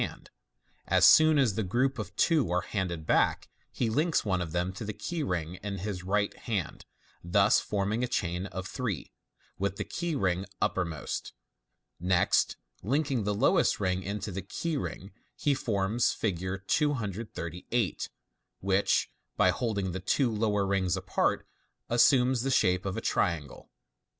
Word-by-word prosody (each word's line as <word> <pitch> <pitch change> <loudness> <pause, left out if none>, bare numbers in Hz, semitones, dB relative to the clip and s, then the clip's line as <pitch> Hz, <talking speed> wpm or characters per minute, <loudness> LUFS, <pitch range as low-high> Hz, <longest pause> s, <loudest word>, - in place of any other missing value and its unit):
As - - +5
soon 155 -1 +7
as 130 -7 +3
the 110 - -1
group 125 +7 0
of 105 - -6
two 155 - +3
are 90 0 +2
handed 90 -5 -3
back, - - +2 0.2
he 120 - -1
links 150 +8 +1
one 95 -3 +1
of 80 -2 -4
them 90 +2 -1
to 95 - -7
the 105 0 -4
key 160 - -4
ring 90 - -3
in 100 -1 -4
his 95 0 -4
right 100 +2 0
hand, 100 -8 -4 0.4
thus 100 +4 +4
forming 105 +3 -1
a - - +1
chain 90 -3 -2
of 95 0 -6
three, 110 - -4 0.5
with 100 0 -1
the - - -3
key 170 -2 -3
ring 95 -6 0
uppermost. 85 -5 -2 0.7
Next 90 0 +2 0.2
linking 135 - 0
the 105 0 0
lowest - - +3
ring 95 -2 0
into 100 +2 -4
the 95 +1 -4
key 165 +9 -3
ring, 100 -8 -5 0.2
he 145 - +1
forms 115 -3 +1
Fig. 95 -5 -2 0.2
238, 110 - -1 0.5
which, 95 +1 +2 0.3
by - - +5
holding 100 -6 -2
the 95 - -4
two 120 +7 +1
lower 105 -2 +1
rings 95 -2 +1
apart, - - 0 0.4
assumes 125 +1 +4
the 135 - -1
shape 90 -7 +2
of 95 +2 -3
a - - -2
triangle. 80 -10 -1
100 Hz, 150 wpm, -29 LUFS, 90-120 Hz, 0.7 s, soon